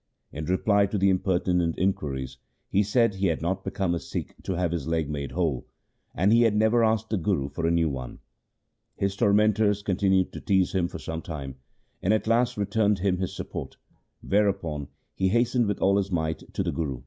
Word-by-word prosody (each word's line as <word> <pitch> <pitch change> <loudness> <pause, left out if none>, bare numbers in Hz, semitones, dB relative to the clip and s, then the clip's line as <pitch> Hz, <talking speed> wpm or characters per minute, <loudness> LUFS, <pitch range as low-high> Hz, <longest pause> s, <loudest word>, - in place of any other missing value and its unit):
In 75 +1 -5
reply 100 +3 +2
to 105 - -2
the 95 0 +3
impertinent 90 -2 +1
inquiries 65 -8 -2 0.3
he 100 - +3
said 115 +2 +2
he 95 0 0
had 80 -2 -1
not 95 +3 -1
become 95 -2 -1
a 85 - -1
Sikh - - -5
to 95 - -3
have 85 -1 0
his 85 -4 -3
leg 80 -2 0
made 70 -2 -4
whole, 80 -8 -1 0.5
and 100 +5 +3
he 115 - +5
had 115 -3 +3
never 110 +2 +3
asked 110 0 +1
the 110 - +1
Guru 80 -6 0
for 80 +4 -2
a - - +2
new 85 -1 +2
one. 65 -4 -5 0.8
His 100 0 -1
tormentors 105 0 +3
con 95 -3 -1
tinued 95 -2 +2
to - - -8
tease 95 -3 +2
him 90 -3 +1
for - - -7
some 80 0 -5
time, 70 -6 -7 0.4
and 100 +4 +3
at 110 - -2
last 120 +2 +2
re 100 - 0
turned 105 -1 +2
him 95 -1 0
his 95 - -3
support, - - -6 0.5
whereupon 95 -8 0 0.3
he 95 - 0
hastened 120 +2 +2
with 100 - -1
all 100 +1 +3
his 100 -1 0
might 80 -2 -2
to - - 0
the - - -1
Guru. 75 -6 -3
95 Hz, 205 wpm, -26 LUFS, 80-105 Hz, 0.8 s, he